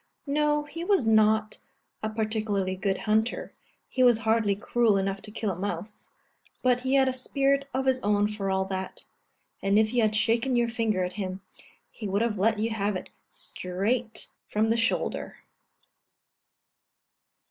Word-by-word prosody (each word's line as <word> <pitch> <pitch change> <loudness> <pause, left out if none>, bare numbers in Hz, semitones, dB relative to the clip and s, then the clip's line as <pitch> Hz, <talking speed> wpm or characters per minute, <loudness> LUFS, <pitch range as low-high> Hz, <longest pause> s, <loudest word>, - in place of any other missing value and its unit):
No, 295 +1 +1
he 330 +3 -7
was 370 - +2
not 215 0 +3 0.4
a 215 - -1
particularly 215 -3 -1
good 195 0 -1
hunter, 220 +2 0 0.3
he 260 - -2
was 245 -3 +6
hardly 220 -2 +3
cruel 220 0 +2
enough 195 0 -1
to - - -9
kill 215 -2 -2
a - - -4
mouse; 200 +2 -5 0.5
but 250 -1 +3
he 260 +1 +1
had 265 -1 +5
a 260 - +1
spirit 275 +2 0
of 265 +1 -1
his 260 -1 +2
own 205 -2 +2
for 210 -2 -3
all 190 0 +1
that, 190 0 -5 0.6
and 195 +1 +2
if 215 +1 +3
you 245 - +3
had 215 -1 +2
shaken 230 +4 +2
your 240 -1 +2
finger 225 -5 0
at 180 0 -3
him, 185 0 -4 0.5
he 215 - -6
would 200 +3 +1
have 215 -4 -1
let 215 +2 +3
you 225 +2 -1
have 205 -2 -1
it 185 - -6 0.2
straight 220 +6 -2 0.2
from 220 +1 +1
the - - +3
shoulder. 230 -1 -1
220 Hz, 165 wpm, -27 LUFS, 200-245 Hz, 0.6 s, was